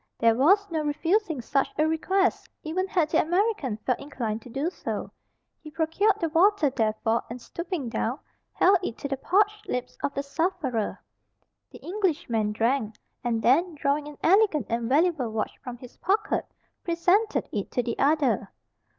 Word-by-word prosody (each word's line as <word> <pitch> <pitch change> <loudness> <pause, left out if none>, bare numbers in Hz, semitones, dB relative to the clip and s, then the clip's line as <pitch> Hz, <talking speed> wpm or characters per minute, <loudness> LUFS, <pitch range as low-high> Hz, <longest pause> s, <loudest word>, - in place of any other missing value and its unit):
There 230 -1 +4
was 360 - +4
no 320 - 0
refusing 325 - 0
such 275 +3 0
a 310 +1 +3
request, 375 +4 +1
even 370 +5 -1
had 345 -5 +1
the - - +4
American 350 - 0
felt 255 - +1
inclined 235 -6 -4
to 245 - -13
do 280 +8 -2
so; - - -5 0.5
he 310 - -11
procured 360 +7 +1
the 330 - 0
water 335 -2 +4
therefore, 225 -1 0
and 240 +2 -6
stooping 340 0 -5
down, 230 +2 -2 0.4
held 385 0 +4
it 240 -10 -4
to - - -4
the 275 -1 -2
parched 415 +7 +1
lips 250 0 -4
of - - -1
the 280 - -1
sufferer. 280 - -2 0.7
The - - -14
Englishman 305 - 0
drank, 225 0 0 0.3
and 230 -2 -1
then 325 +7 +3
drawing 290 +1 0
an 295 -1 -10
elegant 370 - +4
and 230 0 -1
valuable 300 -3 +2
watch 215 -1 -3
from 245 -1 -6
his 245 0 -13
pocket, 410 +2 0 0.4
presented 360 +6 +1
it 205 -2 -3
to 245 - -1
the 235 -1 -4
other. 275 -9 +2
295 Hz, 165 wpm, -26 LUFS, 245-360 Hz, 0.7 s, There